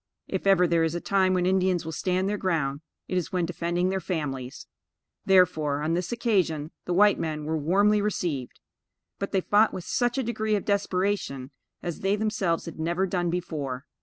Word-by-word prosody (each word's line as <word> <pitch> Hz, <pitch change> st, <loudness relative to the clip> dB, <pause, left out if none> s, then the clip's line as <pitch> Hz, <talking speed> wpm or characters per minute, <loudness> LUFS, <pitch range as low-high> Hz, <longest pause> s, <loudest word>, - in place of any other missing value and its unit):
If 190 Hz, 0 st, -3 dB
ever 190 Hz, -2 st, +5 dB
there 165 Hz, -1 st, +2 dB
is 165 Hz, +1 st, 0 dB
a -, -, -1 dB
time 190 Hz, 0 st, +2 dB
when 180 Hz, -1 st, +1 dB
Indians 185 Hz, -2 st, +2 dB
will 160 Hz, -, -4 dB
stand 185 Hz, +4 st, 0 dB
their 205 Hz, -, 0 dB
ground, 150 Hz, -6 st, -1 dB, 0.3 s
it 185 Hz, -, 0 dB
is 170 Hz, -, -6 dB
when 180 Hz, -2 st, 0 dB
defending 175 Hz, +1 st, -1 dB
their 190 Hz, 0 st, 0 dB
families; 135 Hz, -9 st, -4 dB, 0.6 s
therefore, 160 Hz, -6 st, +3 dB
on 160 Hz, +2 st, 0 dB
this 180 Hz, +4 st, -2 dB
occasion, 185 Hz, -10 st, 0 dB
the 180 Hz, -, -1 dB
white 205 Hz, +2 st, +5 dB
men 155 Hz, -2 st, -3 dB
were 160 Hz, +1 st, -1 dB
warmly 200 Hz, +7 st, +3 dB
received; 170 Hz, -11 st, -2 dB, 0.6 s
but, 200 Hz, -, -3 dB
they 190 Hz, -, +2 dB
fought 210 Hz, +4 st, +3 dB
with 180 Hz, -, -5 dB
such 245 Hz, +6 st, 0 dB
a 265 Hz, -, +1 dB
degree 220 Hz, -2 st, 0 dB
of 200 Hz, -, -2 dB
desperation, 195 Hz, -9 st, -1 dB, 0.3 s
as 170 Hz, -2 st, -4 dB
they 195 Hz, +1 st, +1 dB
themselves 210 Hz, -6 st, -1 dB
had 165 Hz, -2 st, -8 dB
never 170 Hz, +4 st, 0 dB
done 175 Hz, -2 st, -1 dB
before. 150 Hz, -7 st, -3 dB
180 Hz, 190 wpm, -26 LUFS, 160-195 Hz, 0.6 s, ever